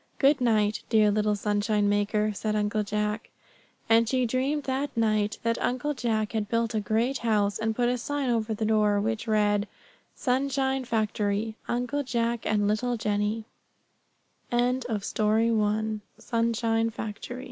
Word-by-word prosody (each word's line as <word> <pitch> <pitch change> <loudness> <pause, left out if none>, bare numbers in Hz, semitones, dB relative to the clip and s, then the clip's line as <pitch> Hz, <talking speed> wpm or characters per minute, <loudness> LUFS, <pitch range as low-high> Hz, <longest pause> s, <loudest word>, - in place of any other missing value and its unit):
"Good 280 0 +4
night, 215 -3 +2
dear 215 -2 +4
little 210 0 +1
sunshine 205 0 +1
maker;" 210 +1 +1
said 215 +1 -2
Uncle 210 0 0
Jack. 210 +1 -2 0.6
And 225 0 +4
she 255 0 +2
dreamed 265 +5 0
that 270 0 -2
night 215 -2 +1
that 230 0 0
Uncle 255 +4 0
Jack 220 -5 -1
had 215 -2 -2
built 230 0 0
a 220 - +1
great 230 +5 0
house, 210 -3 +1
and 220 0 -1
put 245 +1 +1
a 250 0 0
sign 285 -1 -1
over 225 -1 0
the 220 - -2
door, 210 -1 +3
which 220 +2 -2
read: 210 -1 +2 0.5
SUNSHINE 265 0 0
FACTORY, 215 -1 -1
Uncle 250 +4 -1
Jack 235 -3 -1
and 205 -1 +2
little 235 +3 0
Jennie: 210 +1 -1 1.1
[Ill 245 +2 +2
220 Hz, 135 wpm, -27 LUFS, 210-245 Hz, 1.1 s, Good